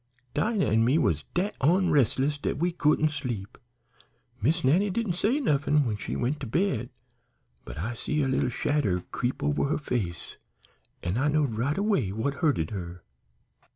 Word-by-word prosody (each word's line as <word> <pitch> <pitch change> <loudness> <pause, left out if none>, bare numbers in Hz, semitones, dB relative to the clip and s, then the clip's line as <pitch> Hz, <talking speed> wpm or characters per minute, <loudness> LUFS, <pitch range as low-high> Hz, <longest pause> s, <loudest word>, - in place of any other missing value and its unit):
Dinah 215 -3 +1
an' 110 +2 +3
me 130 +7 +3
was - - +1
dat 190 +4 0
onresless 145 - +2
dat - - -1
we 175 +4 +1
couldn't 155 -2 +2
sleep. 120 -9 -5 0.9
Miss 160 +10 +1
Nannie 175 +10 +3
didn't 210 -1 -1
say 220 - +1
nuffin 150 - +2
when 110 -3 -1
she 105 - -5
went 135 +5 -1
to 135 - -5
bed, 125 - 0 0.8
but - - -8
I 105 +10 -3
see 150 +5 -1
a - - +1
little 130 -1 +1
shadder 120 -8 0
creep 125 - -2
over 75 - +1
her 150 +3 0
face 110 - -4 0.7
an' 90 +7 -1
I 145 - +2
knowed 150 -5 +1
right 130 +7 -1
away 200 - +1
what 110 +7 -1
hurted 135 - 0
her. 90 -3 -6
140 Hz, 165 wpm, -27 LUFS, 115-160 Hz, 0.9 s, an